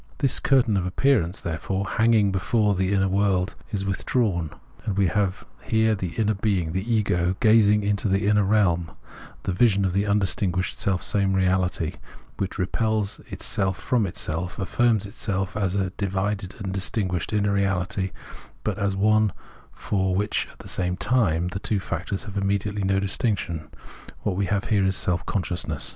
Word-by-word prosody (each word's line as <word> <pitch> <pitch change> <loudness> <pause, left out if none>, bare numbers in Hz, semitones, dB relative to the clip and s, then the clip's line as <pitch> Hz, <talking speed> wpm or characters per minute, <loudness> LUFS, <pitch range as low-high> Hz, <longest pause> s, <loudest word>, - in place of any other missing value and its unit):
This 135 -4 +2
curtain 125 -7 +3
[of 90 -1 -1
appear 135 +8 +3
ance], 85 +5 -5
therefore, 95 +4 -2
hanging 110 -2 +3
before 105 +2 +1
the 95 0 0
inner 95 -1 +2
world 95 0 +1 0.2
is 100 -4 -3
with 95 -1 -2
drawn, 95 -10 0 0.3
and 105 -4 -2
we 100 - +4
have 95 0 0 0.2
here 110 -3 +2
the 95 -5 -4
inner 110 -1 +1
being 95 -5 0
[the 95 +7 -2
ego] 90 -5 +1
gazing 105 -2 +5
into 105 +1 0
the 95 +1 +1
inner 105 0 +4
reahn 95 -5 +1 0.3
— - - -18
the - - -1
vision 100 -1 +3
of 90 - 0
the 100 +2 +1
imdistinguished 95 -2 +1
selfsame 95 0 +1
reahty, 95 -3 0 0.4
which 100 -1 -3
repels 105 +2 0
itself 95 -1 -2
from 120 -5 +1
itself, 85 0 -3
affirms 110 +2 +1
itself 100 -1 -3
as 100 -3 0
a 95 -2 0
divided 100 0 -2
and 95 -3 -4
distinguished 95 -3 -1
inner 105 -1 +1
reahty, 95 -1 0 0.5
but 105 -2 -2
as 100 -1 0
one 110 +1 +3 0.4
for 95 -2 -1
which 105 +2 0
at - - -21
the - - -11
same 90 -1 -1
time 90 -9 +1
the 95 - -4
two 105 0 0
factors 100 +1 -4
have 105 -2 -7
immediately 100 +1 -1
no 95 0 +2
distinction; 95 -5 -1 0.6
what 100 - 0
we 100 0 0
have 100 0 0
here 105 -3 +1
is 95 0 +1
Self 90 -2 0
consciousness. 90 -6 -2
100 Hz, 170 wpm, -24 LUFS, 95-105 Hz, 0.6 s, gazing